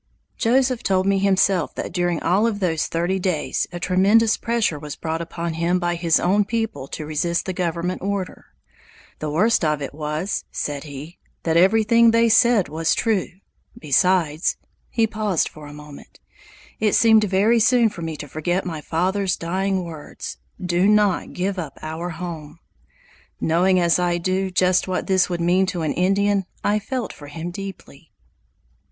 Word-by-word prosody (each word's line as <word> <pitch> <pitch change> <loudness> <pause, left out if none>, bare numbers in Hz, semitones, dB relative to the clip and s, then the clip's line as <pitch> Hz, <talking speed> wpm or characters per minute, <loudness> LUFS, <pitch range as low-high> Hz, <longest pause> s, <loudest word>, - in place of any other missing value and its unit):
Joseph 255 0 +1
told 190 -1 +1
me 195 0 +2
himself 190 -2 +2
that - - -5
during 175 -2 0
all 195 +7 +3
of 210 -3 -2
those 165 -5 0
thirty 175 +3 -1
days 180 -4 -1
a 175 - -6
tremendous 200 +5 +3
pressure 230 -10 -1
was 150 -1 -7
brought 160 0 -3
upon 170 0 -4
him 170 +3 +1
by 175 -1 -1
his 170 -1 +2
own 200 +4 +2
people 225 - -3
to 155 - -6
resist 170 +3 -1
the 185 - -3
government 175 0 -2
order. 195 -1 -4 0.7
"The 155 - -3
worst 185 +8 +2
of 150 -2 +1
it 140 -1 -6
was," 155 +5 -3
said 145 0 -4
he, 150 +4 -9 0.2
"that 165 -1 0
everything 220 +6 +5
they 230 0 +3
said 225 -3 +4
was 160 +2 0
true; 220 -5 0 0.5
besides" 160 +1 +1 0.3
he 230 -2 +2
paused 215 -5 -1
for 150 -1 -11
a - - -10
moment 150 -1 -13 0.6
"it 215 -2 +1
seemed 220 -2 +5
very 205 +4 +3
soon 235 +1 +4
for 205 -5 -6
me 160 -2 -4
to 145 - -7
forget 175 +6 -2
my 160 -4 -5
father's 185 +4 0
dying 190 +2 -1
words, 160 -3 -8 0.2
'Do 180 0 +1
not 210 -3 +2
give 190 +1 -2
up 150 -6 -6
our 160 +3 -4
home!'" 165 -2 -7 0.8
Knowing 180 +3 +2
as 170 0 +3
I 175 -1 +1
do 185 +2 -1
just 185 0 +2
what 185 -1 -2
this 190 -2 +2
would 175 -1 -2
mean 180 +3 +2
to 180 -3 -3
an 155 - -1
Indian, 195 +2 +1 0.2
I 210 +1 +2
felt 250 +3 -4
for 145 - -12
him 165 +4 -6
deeply. 195 +1 -9
180 Hz, 170 wpm, -22 LUFS, 165-200 Hz, 0.8 s, everything